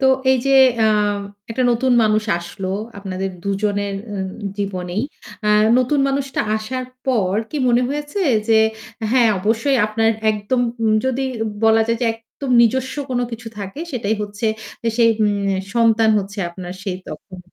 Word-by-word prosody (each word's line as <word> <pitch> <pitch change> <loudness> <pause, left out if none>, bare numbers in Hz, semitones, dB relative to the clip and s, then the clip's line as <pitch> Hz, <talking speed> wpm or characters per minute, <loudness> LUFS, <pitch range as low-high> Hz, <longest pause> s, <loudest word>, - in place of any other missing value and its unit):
তো 265 - +3 0.2
এই 265 - +5
যে 275 - +4 0.2
অ্যা 220 -1 +4 0.6
একটা 245 +3 -1
নতুন 250 +2 +2
মানুষ 215 0 +2 0.2
আসলো 185 +2 -6 0.3
আপনাদের 190 -1 -4
দুজনের 200 0 -1 0.2
উম 190 -1 -3 0.3
জীবনেই। 190 0 -2 0.4
আ - - +3 0.3
নতুন 255 +3 +1
মানুষটা 275 0 -1 0.2
আসার 255 +4 -4 0.2
পর 200 -7 +1 0.2
কি 305 - -4
মনে 240 +1 +3
হয়েছে 295 +7 -3 0.3
যে 225 - +5 0.5
হ্যাঁ 245 -3 +5
অবশ্যই 225 +7 +1
আপনার 225 +1 +1 0.2
একদম 210 +4 -1 0.2
উম 220 -1 +3
যদি 260 +1 0 0.4
বলা 225 0 +5
যায় 230 0 0
যে - - +2
একদম 225 +4 -8
নিজস্ব 260 +3 +1 0.2
কোন 245 -1 0
কিছু 225 0 -6
থাকে, 200 +9 -6
সেটাই 220 -3 0
হচ্ছে 205 +2 -4 0.4
যে 230 - 0
সেই 230 -1 +5
উম 210 -1 +3 0.4
সন্তান 225 -1 +4
হচ্ছে 200 +1 -6
আপনার 180 0 -7
সেই 190 -3 -3
তখন, 185 +4 -9
225 Hz, 155 wpm, -20 LUFS, 200-250 Hz, 0.6 s, এই